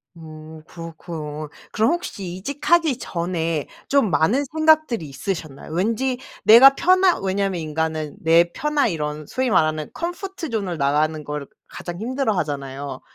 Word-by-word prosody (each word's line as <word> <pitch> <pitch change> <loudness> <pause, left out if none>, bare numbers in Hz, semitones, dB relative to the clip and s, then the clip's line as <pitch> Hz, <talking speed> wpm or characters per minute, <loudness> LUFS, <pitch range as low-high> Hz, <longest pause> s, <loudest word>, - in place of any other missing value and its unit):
음. 155 -1 -11
그렇군. 160 -3 -7 0.2
그럼 225 +7 +2
혹시 345 - -4
이직하기 290 - +1
전에 165 - -2 0.2
좀 275 -6 +3
많은 195 - +2
생각들이 310 - +3
있으셨나요? 155 -1 -6
왠지 230 +8 0 0.3
내가 255 +5 +9
편한 370 - +3
왜냐하면 190 -2 -1
인간은 155 -1 -3
내 170 +1 +4
편한 300 -4 +1
이런 150 -3 -4
소위 260 -1 -1
말하는 155 -5 +1
comfort 350 -1 -5
zone을 195 -7 -2
나가는 150 +2 +1
걸 150 -1 -5 0.2
가장 175 +1 -7
힘들어하잖아요. 145 - -3
175 Hz, 340 characters per minute, -22 LUFS, 155-260 Hz, 0.3 s, 내가